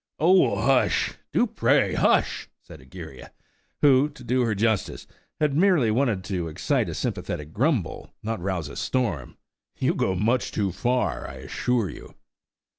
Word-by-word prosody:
"Oh, 155 - +4
hush!–do, 125 +4 +1
pray, - - +2
hush!" - - +1
said - - -14
Egeria, 65 0 -11 0.5
who, 140 0 +5
to 145 -4 -14
do 125 +1 +1
her 115 -3 +1
justice, 110 0 -1 0.3
had 150 -2 +1
merely 160 - +3
wanted 115 -5 +1
to 90 -3 -3
excite 80 - -1
a - - -5
sympathetic 75 +1 -4
grumble, 125 - -1
not 110 +1 -2
to - - -11
rouse 90 -4 -2
a 70 - -9
storm. 105 - -2 0.4
"You - - +1
go 95 - 0
much 115 +7 0
too 100 -3 -1
far, 125 +7 -1
I 65 - -9
assure 115 - -1
you." - - -12
115 Hz, 150 wpm, -25 LUFS, 95-130 Hz, 0.5 s, who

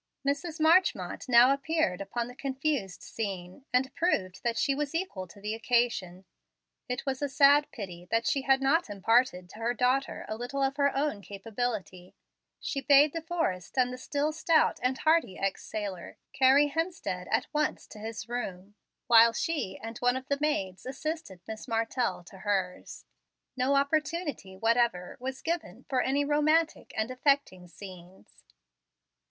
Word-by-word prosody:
Mrs. 300 +3 -2
Marchmont 315 - +2
now 245 +2 +7
appeared 275 - 0
upon 230 +4 -3
the 250 - -10
confused 270 -6 -2
scene, 195 +2 -6
and 260 +1 +1
proved 190 - 0
that 235 -1 -1
she 275 - +2
was 295 +2 -3
equal 330 - -3
to 200 - -15
the 210 +2 -3
occasion. 225 -6 0 0.6
It 250 - -3
was 265 -1 -2
a 285 - 0
sad 285 +1 +5
pity 180 -5 -8
that 230 +1 +1
she 275 - +1
had 270 0 +3
not 300 +1 +2
imparted 205 -2 +2
to 215 - -12
her 235 +2 -1
daughter 255 +3 0
a 215 - -3
little 260 +4 -3
of 270 +1 0
her 280 -1 +3
own 280 -7 -1
capability. 200 -3 -5 0.4
She 275 - -3
bade 285 +1 +6
De 330 - -3
Forrest, 310 - -3
and 250 -1 +2
the - - -6
still 290 +3 -1
stout 315 +1 +2
and 255 +1 0
hearty 315 - +2
ex 195 -1 -2
sailor, 200 -4 -6 0.2
carry 275 +2 +5
Hemstead 320 - -3
at - - +2
once 300 0 0
to 215 - -11
his 220 0 -6
room, 205 -5 -5 0.3
while 230 0 +7
she 285 - -2
and 225 0 -6
one 245 0 +2
of 260 +1 -5
the 280 0 0
maids 195 -12 -1
assisted 275 - -5
Miss 220 0 -7
Martell 225 -4 -1
to 190 +2 -14
hers. 190 -3 -3 0.5
No 265 +2 +2
opportunity 290 - -1
whatever 230 -4 +1
was 260 +1 -5
given 335 +1 -3
for 260 -3 +1
any 280 +3 +1
romantic 310 +2 +1
and 220 +3 -1
affecting 255 -9 +1
scenes. 180 0 -13
250 Hz, 160 wpm, -29 LUFS, 200-285 Hz, 0.6 s, now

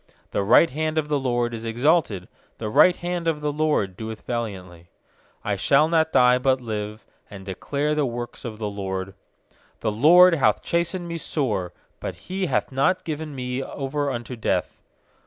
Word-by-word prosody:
16The 100 - -1
right 165 +9 +6
hand 155 +2 -2
of 150 -1 0
the 145 -1 +1
LORD 120 -2 0
is 115 -1 -6
exalted; 115 - +1 0.3
The 110 - -4
right 180 +10 +6
hand 175 -1 -3
of 160 -2 +1
the 150 0 -1
LORD 150 -11 0
doeth 110 +2 -7
valiantly. 95 -8 -5 0.6
17I 100 -2 -1
shall 145 +7 +4
not 160 -1 +2
die, 125 0 +5
but 130 0 +2
live, 110 -2 -5 0.2
And 95 -2 -10
declare 140 +10 -2
the 150 -2 +1
works 120 0 -6
of 110 -3 -6
the 105 -1 -3
LORD. 95 -1 -4 0.7
18The 110 +1 -2
LORD 180 +4 +8
hath 150 -5 +2
chastened 170 +1 -1
me 170 0 -4
sore; 105 - -2 0.3
But - - -5
He 185 0 -4
hath - - -1
not 140 +8 +1
given 155 -2 -5
me 125 0 -3
over 140 +2 -3
unto 120 -1 -5
death. 115 - -2
130 Hz, 175 wpm, -24 LUFS, 110-155 Hz, 0.7 s, LORD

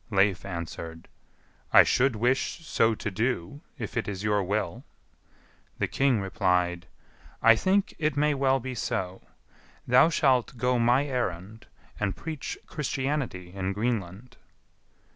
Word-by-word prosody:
Leif 100 -3 +2
answered, 85 -2 -6 0.6
"I - - +9
should 130 -1 +2
wish 125 +8 0
so 115 -6 +2
to 105 - -4
do, 115 - -2 0.2
if 110 -6 -6
it - - -1
is 100 -1 -4
your 105 -1 +2
will." 95 -2 -2 0.9
The - - 0
king 135 -4 +2
replied, 90 -2 0 0.5
"I 115 0 +7
think 190 - +1
it 155 -2 0
may 150 +1 +3
well 135 -1 +2
be 130 +1 -5
so; 95 -6 -3 0.6
thou 125 +6 +5
shalt 130 -6 +2
go 125 +1 +1
my 120 +4 +3
errand, 110 -5 -4 0.3
and 100 -3 -1
preach 155 -3 -5
Christianity 135 - -3
in 95 0 -2
Greenland." 110 +1 -3
115 Hz, 130 wpm, -27 LUFS, 95-135 Hz, 0.9 s, I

